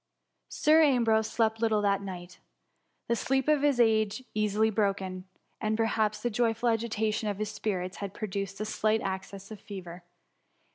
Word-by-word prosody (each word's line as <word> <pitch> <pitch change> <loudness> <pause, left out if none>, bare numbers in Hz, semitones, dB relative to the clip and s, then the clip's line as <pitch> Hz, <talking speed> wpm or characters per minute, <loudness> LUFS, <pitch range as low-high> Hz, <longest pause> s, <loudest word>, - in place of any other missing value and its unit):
Sir 310 +2 +4
Ambrose 230 -7 +3
slept 225 -1 0
little 220 -2 +2
that 200 -1 +2
night: 180 -2 -8 0.7
the 235 - +2
sleep 265 +4 0
of 300 -2 +3
age 225 -5 +3
is - - -23
easily 215 +1 +1
broken, 195 -3 -1 0.4
and 215 -1 0
perhaps 215 -2 0
the 240 - 0
joyful 230 +1 +1
a^tation 220 -1 0
of 200 - -3
his 215 0 -3
spirits 185 -4 -3
had 200 -1 -6
produced 195 -2 -4
a 215 - -2
slight 215 +1 +1
access 195 +1 -5
of 215 - -8
fever. 180 -3 -8
215 Hz, 155 wpm, -29 LUFS, 200-225 Hz, 0.7 s, Sir